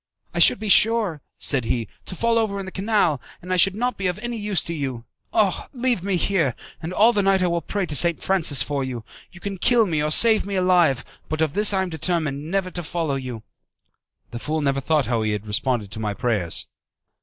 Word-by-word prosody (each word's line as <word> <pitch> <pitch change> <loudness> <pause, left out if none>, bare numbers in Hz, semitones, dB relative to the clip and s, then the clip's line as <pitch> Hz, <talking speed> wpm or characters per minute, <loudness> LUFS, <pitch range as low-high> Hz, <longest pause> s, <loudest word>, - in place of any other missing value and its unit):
"I - - -2
should - - +6
be 215 +1 -5
sure," 210 -6 +4 0.2
said 130 -5 0
he, 115 -1 -1 0.2
"to 185 - -6
fall 230 +3 +1
over 210 -3 -1
into 190 -1 -6
the - - -16
canal, 190 - 0 0.2
and 180 +1 -4
I - - +2
should 190 +2 +4
not 245 +3 -2
be 190 - 0
of 180 - -2
any 240 +2 -5
use 205 -3 0
to 170 - -3
you. 130 -6 -4 0.3
Ah! 205 -5 0
leave 250 -5 0
me 195 +1 -1
here, 170 -8 +1 0.3
and 165 +2 -5
all 220 +5 +4
the 205 - +2
night 195 -1 +2
I - - +2
will 170 -1 -1
pray 200 +4 -2
to 150 - -5
St. 170 +3 +3
Francis 160 -8 +2
for 145 -2 -2
you. 125 -3 -5 0.3
You 175 - -14
can 195 0 -6
kill 235 +3 +4
me 160 -6 -1
or 150 - 0
save 220 +7 +5
me 200 0 -4
alive; 175 -8 +2 0.2
but 155 - -3
of 160 -3 0
this 210 0 +6
I 190 -1 +1
am 185 - -5
determined, 155 -2 -2
never 190 0 -1
to 175 - -3
follow 165 -2 -3
you." 125 -5 -5 0.9
The 120 - -6
fool 155 +4 -2
never 140 -1 0
thought 150 -1 +1
how 115 -2 -1
he 110 -1 -1
had 105 0 -5
responded 105 0 -1
to - - -5
my 105 -2 -3
prayers. 105 -9 -1
170 Hz, 235 wpm, -22 LUFS, 135-195 Hz, 0.9 s, should